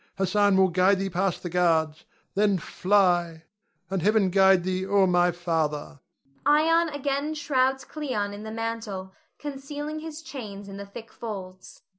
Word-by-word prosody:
Hassan 195 Hz, +1 st, +3 dB
will 190 Hz, 0 st, +5 dB
guide 185 Hz, +3 st, +3 dB
thee 195 Hz, 0 st, -3 dB
past 185 Hz, +1 st, -1 dB
the 175 Hz, -, -3 dB
guards. 160 Hz, -3 st, +1 dB, 0.3 s
Then 205 Hz, -1 st, +2 dB
fly, 175 Hz, -2 st, +1 dB, 0.4 s
and 190 Hz, 0 st, -2 dB
Heaven 205 Hz, 0 st, +3 dB
guide 190 Hz, -1 st, +5 dB
thee, 185 Hz, 0 st, -1 dB
O 195 Hz, 0 st, +3 dB
my 175 Hz, -1 st, +3 dB
father! 160 Hz, -4 st, -2 dB, 0.4 s
[Ion 320 Hz, +3 st, +4 dB
again 285 Hz, +1 st, -2 dB
shrouds 265 Hz, -3 st, +1 dB
Cleon 250 Hz, -10 st, -3 dB
in 205 Hz, -, -8 dB
the 220 Hz, -, -7 dB
mantle, 225 Hz, -4 st, -5 dB, 0.2 s
concealing 290 Hz, +2 st, -6 dB
his 320 Hz, 0 st, -8 dB
chains 205 Hz, -9 st, -8 dB
in 195 Hz, 0 st, -8 dB
the 200 Hz, 0 st, -8 dB
thick 225 Hz, +3 st, -11 dB
folds. 190 Hz, -5 st, -8 dB
200 Hz, 150 wpm, -26 LUFS, 185-260 Hz, 0.4 s, will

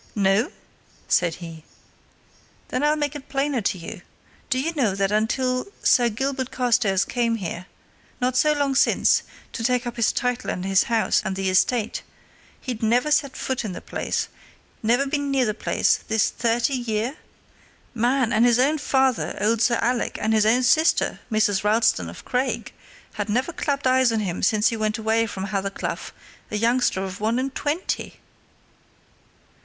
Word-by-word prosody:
"No?" 200 Hz, +2 st, +2 dB, 0.6 s
said 170 Hz, -2 st, +2 dB
he. 165 Hz, -3 st, -10 dB, 1.1 s
"Then 255 Hz, -, -1 dB
I'll 300 Hz, +1 st, +3 dB
make 295 Hz, -1 st, -2 dB
it 285 Hz, -2 st, -9 dB
plainer 275 Hz, -2 st, 0 dB
to 195 Hz, -, -1 dB
you. 175 Hz, +3 st, -8 dB, 0.5 s
Do 255 Hz, -, +1 dB
you 325 Hz, +5 st, -1 dB
know 235 Hz, -11 st, +1 dB
that 195 Hz, 0 st, 0 dB
until 255 Hz, +4 st, +1 dB
yon 400 Hz, -, -18 dB
Sir 240 Hz, -1 st, +4 dB
Gilbert 260 Hz, +3 st, -2 dB
Carstairs 220 Hz, -6 st, +1 dB
came 235 Hz, -2 st, 0 dB
here, 180 Hz, -3 st, -5 dB, 0.5 s
not 250 Hz, 0 st, 0 dB
so 300 Hz, +4 st, +4 dB
long 285 Hz, -2 st, 0 dB
since, 270 Hz, -, +3 dB, 0.3 s
to 225 Hz, -, -4 dB
take 250 Hz, +1 st, +1 dB
up 240 Hz, 0 st, -5 dB
his 230 Hz, -, +2 dB
title 250 Hz, -1 st, -2 dB
and 180 Hz, -, -3 dB
his 195 Hz, 0 st, +3 dB
house 230 Hz, -2 st, +2 dB
and 190 Hz, -, -3 dB
the 190 Hz, -1 st, -1 dB
estate, 215 Hz, +4 st, +1 dB, 0.6 s
he'd 245 Hz, -4 st, -5 dB
never 245 Hz, +6 st, +2 dB
set 285 Hz, -3 st, +1 dB
foot 260 Hz, -2 st, -2 dB
in 210 Hz, -4 st, -4 dB
the -, -, -6 dB
place, -, -, -3 dB, 0.5 s
never 240 Hz, +5 st, +2 dB
been 285 Hz, 0 st, -2 dB
near 270 Hz, -2 st, +2 dB
the 215 Hz, -, 0 dB
place, -, -, +1 dB
this 220 Hz, -1 st, +1 dB
thirty 235 Hz, +3 st, 0 dB
year? 240 Hz, +1 st, -2 dB, 0.8 s
Man! 245 Hz, +1 st, +1 dB
his 240 Hz, -1 st, +4 dB
own 290 Hz, +5 st, +2 dB
father, 265 Hz, -3 st, +1 dB
old 215 Hz, +2 st, +1 dB
Sir 235 Hz, 0 st, +3 dB
Alec, 245 Hz, 0 st, 0 dB
and 220 Hz, +1 st, 0 dB
his 215 Hz, -1 st, +3 dB
own 245 Hz, +3 st, +3 dB
sister, 315 Hz, +7 st, +3 dB
Mrs. 205 Hz, -3 st, +2 dB
Ralston 210 Hz, -, +2 dB
of 85 Hz, -, -11 dB
Craig, 250 Hz, -3 st, -2 dB, 0.4 s
had 210 Hz, 0 st, -4 dB
never 255 Hz, +10 st, 0 dB
clapped 285 Hz, -2 st, -2 dB
eyes 255 Hz, -1 st, +4 dB
on 225 Hz, -1 st, 0 dB
him 180 Hz, -4 st, -3 dB
since 210 Hz, +2 st, +3 dB
he 230 Hz, -, -3 dB
went 215 Hz, 0 st, -1 dB
away 225 Hz, +1 st, +1 dB
from 190 Hz, -3 st, -5 dB
Hathercleugh 195 Hz, -1 st, -3 dB, 0.4 s
a -, -, -4 dB
youngster 230 Hz, -3 st, +1 dB
of 190 Hz, 0 st, -6 dB
one 220 Hz, +3 st, 0 dB
and 265 Hz, +1 st, -2 dB
twenty!" 295 Hz, +6 st, -3 dB
235 Hz, 170 wpm, -23 LUFS, 210-260 Hz, 1.1 s, Sir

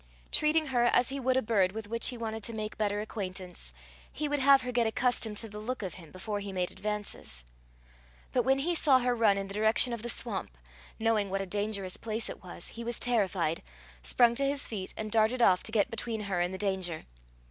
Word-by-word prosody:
Treating 310 Hz, +1 st, +3 dB
her 240 Hz, -1 st, +3 dB
as 245 Hz, +1 st, +3 dB
he 275 Hz, +1 st, -4 dB
would 260 Hz, 0 st, +1 dB
a 260 Hz, -, +2 dB
bird 200 Hz, -4 st, +2 dB
with 220 Hz, -1 st, -6 dB
which 230 Hz, +2 st, +1 dB
he 245 Hz, -, -2 dB
wanted 225 Hz, -1 st, -4 dB
to 230 Hz, -, -3 dB
make 215 Hz, -1 st, -4 dB
better 205 Hz, -1 st, 0 dB
acquaintance, 185 Hz, -, -5 dB, 0.4 s
he 300 Hz, -, -3 dB
would 290 Hz, 0 st, 0 dB
have 270 Hz, 0 st, +6 dB
her 250 Hz, -, -3 dB
get 240 Hz, -2 st, +2 dB
accustomed 225 Hz, -2 st, 0 dB
to 225 Hz, -, +3 dB
the 210 Hz, 0 st, -8 dB
look 235 Hz, +1 st, -4 dB
of 185 Hz, -4 st, -4 dB
him 165 Hz, -4 st, -12 dB
before 205 Hz, +3 st, -4 dB
he 200 Hz, -1 st, -6 dB
made 180 Hz, -1 st, -2 dB
advances. 210 Hz, -, -5 dB, 0.9 s
But 250 Hz, -, +2 dB
when 265 Hz, +2 st, +3 dB
he 325 Hz, +6 st, 0 dB
saw 295 Hz, -5 st, +5 dB
her 250 Hz, -1 st, +1 dB
run 215 Hz, -4 st, +4 dB
in 195 Hz, -, -2 dB
the 195 Hz, -, -8 dB
direction 220 Hz, +3 st, +4 dB
of 235 Hz, -, -4 dB
the 240 Hz, -, -5 dB
swamp, 200 Hz, -, -3 dB, 0.4 s
knowing 220 Hz, -3 st, +1 dB
what 195 Hz, +1 st, -1 dB
a -, -, -3 dB
dangerous 200 Hz, -1 st, -1 dB
place 225 Hz, 0 st, -1 dB
it -, -, -11 dB
was, 175 Hz, -1 st, -5 dB
he 235 Hz, -, -7 dB
was 240 Hz, +1 st, -3 dB
terrified, 190 Hz, -9 st, 0 dB, 0.4 s
sprung 235 Hz, -, +4 dB
to 275 Hz, -, +2 dB
his 280 Hz, +1 st, +1 dB
feet, 195 Hz, -4 st, -5 dB
and 215 Hz, -1 st, -4 dB
darted 225 Hz, +3 st, +3 dB
off 185 Hz, -6 st, +5 dB
to -, -, -5 dB
get 215 Hz, -3 st, +2 dB
between 225 Hz, -1 st, -3 dB
her 195 Hz, -4 st, -1 dB
and 175 Hz, +1 st, 0 dB
the 190 Hz, -, -5 dB
danger. 190 Hz, -5 st, -2 dB
220 Hz, 225 wpm, -30 LUFS, 195-240 Hz, 0.9 s, have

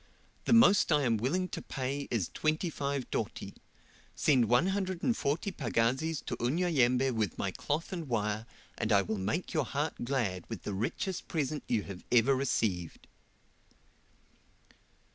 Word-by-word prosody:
The -, -, +3 dB
most 215 Hz, -6 st, +6 dB
I 150 Hz, -2 st, +4 dB
am 115 Hz, -3 st, +2 dB
willing 165 Hz, -, 0 dB
to -, -, -5 dB
pay 135 Hz, +2 st, -3 dB
is 105 Hz, -8 st, -1 dB
25 150 Hz, -4 st, -1 dB
doti: -, -, -3 dB, 0.6 s
send 130 Hz, -5 st, +4 dB
one 125 Hz, -, +3 dB
hundred 190 Hz, -2 st, -2 dB
and 240 Hz, -, +2 dB
forty 165 Hz, +6 st, -1 dB
pagazis 135 Hz, +2 st, 0 dB
to -, -, -2 dB
Unyanyembe 130 Hz, -2 st, +2 dB
with 110 Hz, -6 st, -1 dB
my -, -, -1 dB
cloth 155 Hz, +6 st, -3 dB
and 170 Hz, -4 st, -4 dB
wire, 110 Hz, -2 st, -1 dB, 0.3 s
and 110 Hz, -, 0 dB
I 100 Hz, -1 st, +5 dB
will 105 Hz, +2 st, -3 dB
make 110 Hz, -, -2 dB
your 155 Hz, -, +1 dB
heart 145 Hz, 0 st, -2 dB
glad 115 Hz, -9 st, -1 dB
with 115 Hz, -5 st, -6 dB
the 105 Hz, -, -3 dB
richest 115 Hz, -, -3 dB
present 150 Hz, -2 st, -2 dB
you 115 Hz, -4 st, +1 dB
have 95 Hz, -3 st, -9 dB
ever 125 Hz, +2 st, +5 dB
received." 110 Hz, -, -1 dB
135 Hz, 150 wpm, -31 LUFS, 115-160 Hz, 0.6 s, most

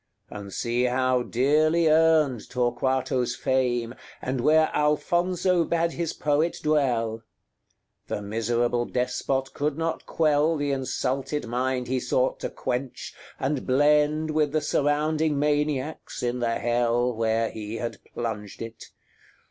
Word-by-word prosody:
And 100 Hz, -1 st, -8 dB
see 120 Hz, +4 st, 0 dB
how 130 Hz, 0 st, +2 dB
dearly 155 Hz, +7 st, +2 dB
earned 155 Hz, -6 st, +3 dB
Torquato's 125 Hz, 0 st, 0 dB
fame, 120 Hz, -3 st, 0 dB, 0.3 s
And 130 Hz, -1 st, -2 dB
where 155 Hz, +3 st, +4 dB
Alfonso 175 Hz, +4 st, +1 dB
bade 170 Hz, 0 st, 0 dB
his 170 Hz, -2 st, -2 dB
poet 150 Hz, +3 st, 0 dB
dwell. 120 Hz, -7 st, +1 dB, 0.9 s
The -, -, -3 dB
miserable 120 Hz, +3 st, 0 dB
despot 130 Hz, +2 st, -1 dB
could 145 Hz, 0 st, -1 dB
not 165 Hz, 0 st, -3 dB
quell 155 Hz, 0 st, +2 dB
The 145 Hz, -1 st, -1 dB
insulted 135 Hz, +1 st, -2 dB
mind 125 Hz, +1 st, -1 dB
he 130 Hz, +1 st, 0 dB
sought 125 Hz, +1 st, 0 dB
to -, -, -3 dB
quench, 125 Hz, 0 st, -4 dB, 0.3 s
and 135 Hz, 0 st, -2 dB
blend 150 Hz, +3 st, +3 dB
With 150 Hz, -2 st, +1 dB
the 155 Hz, -, +2 dB
surrounding 150 Hz, +1 st, +1 dB
maniacs, 150 Hz, -1 st, -1 dB
in 120 Hz, 0 st, -1 dB
the 115 Hz, -1 st, 0 dB
hell 120 Hz, +1 st, +1 dB
Where 115 Hz, 0 st, 0 dB
he 110 Hz, 0 st, -6 dB
had 120 Hz, 0 st, -5 dB
plunged 110 Hz, -3 st, -5 dB
it. 115 Hz, 0 st, -9 dB
130 Hz, 125 wpm, -26 LUFS, 120-150 Hz, 0.9 s, where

